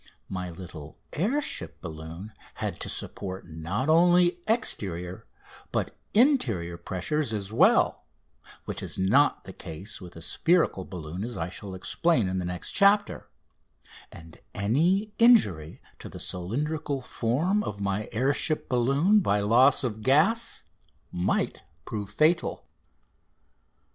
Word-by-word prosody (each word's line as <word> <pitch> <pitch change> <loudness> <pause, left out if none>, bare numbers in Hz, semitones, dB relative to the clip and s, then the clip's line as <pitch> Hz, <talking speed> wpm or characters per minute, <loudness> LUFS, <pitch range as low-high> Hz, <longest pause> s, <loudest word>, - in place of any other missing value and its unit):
My 90 -1 -4
little 80 -4 -10 0.2
air 220 - +1
ship - - -5
balloon 80 +4 -8 0.2
had - - -4
to - - -3
support 95 -1 -4
not 85 - -3
only 175 +2 +4
exterior 95 - -1 0.4
but - - -2 0.2
interior 120 - +2
pressure 95 - -3
as 110 -8 -3
well - - +3 0.6
which - - -5
is - - -3
not 120 +11 +3
the 95 - -10
case 90 +6 -7
with 90 -1 -11
a 85 - -10
spherical 130 - +1
balloon, 90 +1 -6
as 120 +1 -5
I 85 +1 -3
shall 95 +1 -8
explain 125 - +1
in 95 0 -1
the 90 - -3
next 90 0 -4
chapter 205 +1 +3 0.8
and 80 -1 -13 0.2
any 170 - +1
injury 105 - +4 0.2
to - - -9
the - - -10
cylindrical 140 - -2
form 160 - 0
of 100 - -5
my 100 +1 -2
air 130 +7 +1
ship 155 +1 0
balloon 140 - +3
by 105 - +1
loss 125 +7 +4
of 110 -4 -3
gas 160 - +2 0.5
might 90 +1 -1 0.2
prove 105 -2 -5
fatal. 155 +10 +1
110 Hz, 130 wpm, -27 LUFS, -, 0.8 s, only